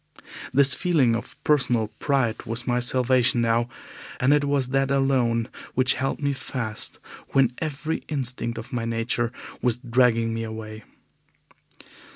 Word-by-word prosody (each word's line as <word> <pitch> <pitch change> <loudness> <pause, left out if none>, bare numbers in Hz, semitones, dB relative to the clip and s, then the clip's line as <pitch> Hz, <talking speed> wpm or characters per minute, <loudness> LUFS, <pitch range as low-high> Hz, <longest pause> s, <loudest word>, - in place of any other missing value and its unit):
This 135 0 +5
feeling 150 -10 +2
of 115 - -6
personal 125 -7 +2
pride 130 -5 0
was 115 +2 -3
my 125 0 +1
salvation 125 0 +3
now, 115 +1 +1 0.5
and 130 +3 +4
it 145 -1 +2
was 140 -3 0
that 135 0 +1
alone 130 -4 +2 0.3
which 130 +1 +3
held 135 +1 -2
me 140 -1 0
fast 120 -5 -3 0.4
when 130 -3 +4
every 155 +1 -2
instinct 125 -5 -1
of 115 +1 -8
my 115 -2 -1
nature 115 +1 -1 0.3
was 125 -2 +1
dragging 120 -2 +2
me 115 - -3
away. 110 -1 -7
125 Hz, 140 wpm, -24 LUFS, 115-135 Hz, 0.5 s, This